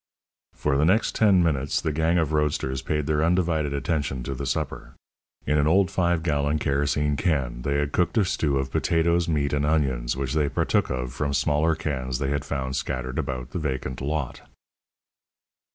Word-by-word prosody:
For 70 -2 0
the 70 - +2
next 95 +8 +3
ten 100 -5 +4
minutes 70 -4 0
the 80 - -1
gang 80 +3 +1
of 80 -3 0
roadsters 70 -3 0
paid 75 0 -1
their 75 +1 +1
undivided 80 -4 +1
attention 70 -3 -2
to 70 - -4
the 65 - -5
supper. - - -3 0.5
In 75 +2 +2
an 70 - +2
old 95 +3 +3
five 85 -3 +1
gallon 75 -2 +1
kerosene 75 0 0
can 65 -8 -1
they 70 +3 -1
had 70 0 0
cooked 90 +9 0
a 105 - +4
stew 75 -5 0
of 65 0 -2
potatoes, 85 +3 +1
meat, 75 -3 0
and 70 0 +1
onions, 65 -6 0
which 65 0 -2
they 75 -2 +1
partook - - +1
of 65 -1 -3
from 70 -2 -1
smaller 75 +3 +2
cans 65 -5 -3
they 70 +1 -2
had 70 -1 -1
found 65 -2 -3
scattered 65 0 -3
about 65 -1 -4
the 90 - -3
vacant 65 -4 -3
lot. 75 -1 -3
75 Hz, 185 wpm, -25 LUFS, 65-80 Hz, 0.5 s, ten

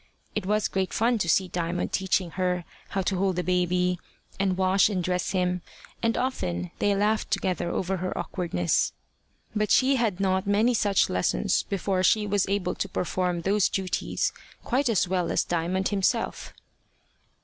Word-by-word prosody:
It 205 -3 -3
was 210 0 +2
great 190 -1 -2
fun 230 +1 +2
to 175 - -1
see 190 +3 +3
Diamond 175 0 -2
teaching 190 -2 0
her 180 -1 -1 0.2
how 195 -1 -1
to 190 +1 0
hold 190 0 +1
the 180 - -1
baby, 180 0 +1 0.4
and 190 -2 +1
wash 190 +2 +4
and 185 -4 -1
dress 180 0 -1
him, 180 -1 0 0.4
and 230 0 +1
often 90 - -2
they 205 -1 +2
laughed 210 +2 +1
together 190 -3 -1
over 190 +2 -1
her 185 +1 -3
awkwardness. 125 - 0 0.6
But 210 0 +1
she 265 +1 +4
had 220 -6 0
not 190 0 +1
many 215 +5 +3
such 205 -4 +3
lessons 90 -9 +1
before 195 -1 -1
she 210 +3 +3
was 205 -2 +1
able 195 -3 0
to 200 - -3
perform 180 -1 -1
those 200 +2 +2
duties 185 -2 -1 0.3
quite 260 +1 +1
as 205 -4 +2
well 180 -1 0
as - - +2
Diamond 175 +3 -1
himself. 200 -2 -1
190 Hz, 165 wpm, -26 LUFS, 180-205 Hz, 0.6 s, wash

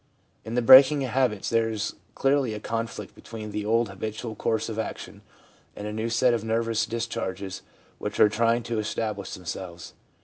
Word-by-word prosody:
In 110 +2 -5
the 125 - +2
breaking 135 +3 +8
of 130 - -3
habits 125 -6 0
there 115 -1 +2
is 110 -1 -3 0.2
clearly 135 -5 +1
a - - -5
conflict 115 +1 -4
between 110 -2 -8
the 105 0 -3
old 115 0 +2
habitual 110 +4 -5
course 110 +1 -1
of 110 -1 -4
action 110 - -6 0.5
and 105 - -7
a 105 - -4
new 110 +2 -2
set 120 +1 +3
of 115 -2 -1
nervous 115 0 0
discharges 100 -4 -4 0.4
which - - -4
are - - +8
trying 115 +2 +1
to 115 -1 -2
establish 105 -1 -3
themselves. 90 -1 -7
115 Hz, 175 wpm, -26 LUFS, 105-115 Hz, 0.5 s, breaking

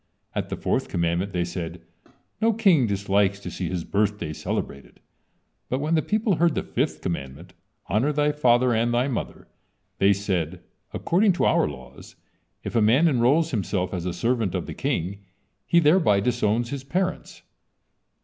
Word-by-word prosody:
At - - -3
the - - -3
fourth - - -1
commandment 85 +3 -1
they 90 -2 0
said: 85 -1 -6 0.6
"No 225 +1 +3
King 190 - +4
dislikes 100 0 +1
to - - -6
see 90 - -4
his 90 -2 -3
birthday 100 -6 -1
celebrated." 70 -2 -5 0.7
But 130 - 0
when 150 +4 -1
the 160 - +3
people 210 -2 0
heard 170 -1 +2
the - - -1
fifth - - -2
commandment, 85 +2 -5 0.3
"Honor 110 +11 +1
thy 150 0 +1
father 125 -4 +3
and 115 +1 +1
thy 120 +2 +1
mother," 130 - -5 0.5
they 100 +1 +5
said: 95 -4 -2 0.3
"According 195 +3 +2
to 175 - 0
our - - +3
laws, 65 -1 -11 0.5
if - - -6
a 115 - +4
man 125 +10 +4
enrolls 145 +4 +2
himself 95 -5 -2
as 90 -1 -3
a - - -1
servant 115 -1 -1
of - - -2
the - - -6
king, 95 +4 -2 0.5
he 170 - +5
thereby 150 - +4
disowns 115 +1 0
his 140 -2 -4
parents. 180 +6 -3
110 Hz, 165 wpm, -24 LUFS, 90-150 Hz, 0.7 s, they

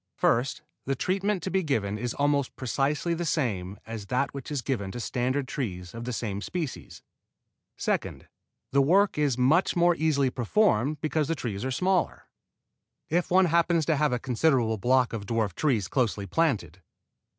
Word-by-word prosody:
First, 125 +3 +1 0.2
the 135 - 0
treatment 195 +5 -1
to 190 - -3
be 190 - +2
given 105 - -1
is 120 0 -3
almost 145 -1 +1
precisely 140 +6 -1
the 170 +1 -2
same 105 - -1
as 110 -3 -7
that 125 +5 0
which 140 -2 -7
is 145 -5 -3
given 105 -8 -2
to 120 - -5
standard 130 +3 -1
trees 90 -11 -4
of 115 0 -6
the 125 - -3
same 105 -4 -3
species; 165 +1 -5 0.7
second, - - -2 0.4
the 140 - +4
work 185 +5 +3
is 140 -5 +1
much 150 +11 +3
more 175 0 +4
easily 145 -5 +1
performed 140 - +1
because 155 -1 0
the 165 - 0
trees 110 -7 -4
are 130 - -1
smaller. 180 +7 0 0.9
If 175 +2 +1
one 185 +1 +5
happens 170 -1 +2
to 160 - +2
have 150 0 +2
a 125 - +1
considerable 120 -3 +1
block 125 +3 +2
of 100 -3 -5
dwarf 110 -4 0
trees 115 - 0
closely 110 -6 0
planted. 100 - 0
135 Hz, 170 wpm, -27 LUFS, 115-160 Hz, 0.9 s, one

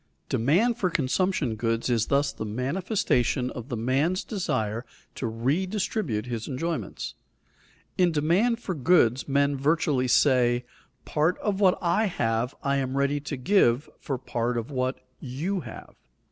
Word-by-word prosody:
Demand 180 - +2
for 185 - +2
consumption 150 -3 0
goods 115 +1 -1
is 115 -3 +1
thus 140 +1 +1
the - - -5
manifestation 125 - 0
of 125 0 -8
the 120 - -3
man's 135 - +1
desire 115 - -2 0.3
to 125 - -3
redistribute 145 - -1
his 115 -3 -4
enjoyments. 145 - -3 0.9
In 180 -1 +4
demand 175 +10 +2
for 195 - -4
goods 135 -5 +3
men 140 0 +2
virtually 140 -2 +1
say: 125 -2 +3 0.4
"Part 160 +5 +1
of 200 -2 -2
what 190 -3 +4
I 180 +6 +2
have 120 - -1
I 140 0 +1
am 135 0 -2
ready 140 +1 +1
to 145 0 -5
give 130 - +2
for 135 - -3
part 120 -1 -2
of 115 +4 -4
what 130 0 -2
you 155 +10 -3
have." - - -10
140 Hz, 145 wpm, -26 LUFS, 120-175 Hz, 0.9 s, In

